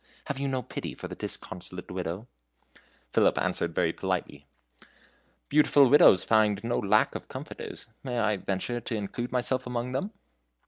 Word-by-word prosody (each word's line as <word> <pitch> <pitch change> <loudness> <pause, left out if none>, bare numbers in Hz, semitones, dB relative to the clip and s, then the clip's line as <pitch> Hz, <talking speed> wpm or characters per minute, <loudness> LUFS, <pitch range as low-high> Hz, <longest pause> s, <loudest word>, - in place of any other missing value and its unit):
Have 135 - -3
you 140 - -1
no 130 -2 -1
pity - - -6
for - - -7
the - - -8
disconsolate 90 0 -7
Widow?" 90 +4 -4 0.9
Philip - - +4
answered 85 -1 -1
very 85 -2 +2
politely: 85 -7 -3 1.0
"Beautiful 145 -3 +5
widows 140 -10 +7
find 105 -2 +3
no 120 +1 0
lack 100 - +3
of - - -7
comforters. - - -7 0.2
May 125 -3 -3
I 110 -3 +2
venture 100 +6 -2
to 115 - -4
include 110 +4 -4
myself 125 +1 0
amongst 125 +1 -3
them?" 195 +10 -2
115 Hz, 150 wpm, -28 LUFS, 95-125 Hz, 1.0 s, widows